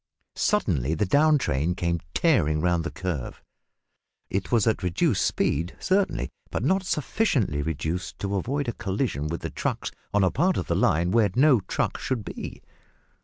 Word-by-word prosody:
Suddenly 80 Hz, -, +1 dB
the 95 Hz, -, +1 dB
down 150 Hz, +9 st, +4 dB
train 80 Hz, -, 0 dB
came 85 Hz, -1 st, -1 dB, 0.2 s
tearing 85 Hz, -, +3 dB
round 85 Hz, 0 st, +1 dB
the 85 Hz, -, -3 dB
curve. 90 Hz, -9 st, -4 dB, 0.9 s
It 95 Hz, 0 st, -2 dB
was 115 Hz, -4 st, +3 dB
at 110 Hz, -3 st, +1 dB
reduced 90 Hz, -2 st, +1 dB
speed 85 Hz, +5 st, 0 dB
certainly, 195 Hz, +1 st, 0 dB, 0.2 s
but -, -, -3 dB
not 190 Hz, 0 st, +2 dB
sufficiently 145 Hz, -, 0 dB
reduced 80 Hz, +4 st, -3 dB
to 100 Hz, 0 st, -3 dB
avoid 135 Hz, +8 st, -1 dB
a 120 Hz, -, -1 dB
collision 95 Hz, -, -2 dB
with 85 Hz, +2 st, -4 dB
the -, -, -4 dB
trucks -, -, -2 dB, 0.2 s
on 105 Hz, -1 st, +3 dB
a 95 Hz, -, +3 dB
part 185 Hz, +1 st, +2 dB
of -, -, -1 dB
the -, -, -1 dB
line 85 Hz, -2 st, +2 dB
where 110 Hz, -2 st, +4 dB
no 135 Hz, -1 st, +5 dB
trucks -, -, -2 dB
should 120 Hz, -6 st, -2 dB
be. -, -, -7 dB
95 Hz, 170 wpm, -26 LUFS, 85-135 Hz, 0.9 s, no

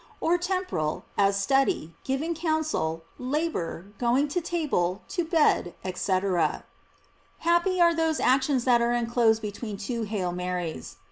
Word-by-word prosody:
or 335 Hz, -, +2 dB
temporal, 355 Hz, -, -2 dB
as 200 Hz, 0 st, +3 dB
study, 265 Hz, -, +1 dB
giving 280 Hz, +5 st, -1 dB
counsel, 315 Hz, -, -1 dB, 0.2 s
labor, 255 Hz, -, -2 dB
going 250 Hz, +4 st, +2 dB
to 350 Hz, +5 st, -1 dB
table, 270 Hz, -, -1 dB
to 350 Hz, -, -1 dB
bed, 315 Hz, -, +2 dB, 0.2 s
&c. 185 Hz, +1 st, +1 dB, 1.2 s
Happy 345 Hz, +2 st, +2 dB
are 340 Hz, -1 st, +6 dB
those 325 Hz, -1 st, 0 dB
actions 260 Hz, 0 st, +2 dB
that 240 Hz, -2 st, +4 dB
are 235 Hz, 0 st, +2 dB
enclosed 230 Hz, -2 st, +2 dB
be 210 Hz, -, -2 dB
tween 210 Hz, 0 st, -6 dB
two 230 Hz, +4 st, -3 dB
"Hail 200 Hz, -5 st, -2 dB
Marys!" 180 Hz, -2 st, -4 dB
250 Hz, 135 wpm, -27 LUFS, 195-320 Hz, 1.2 s, are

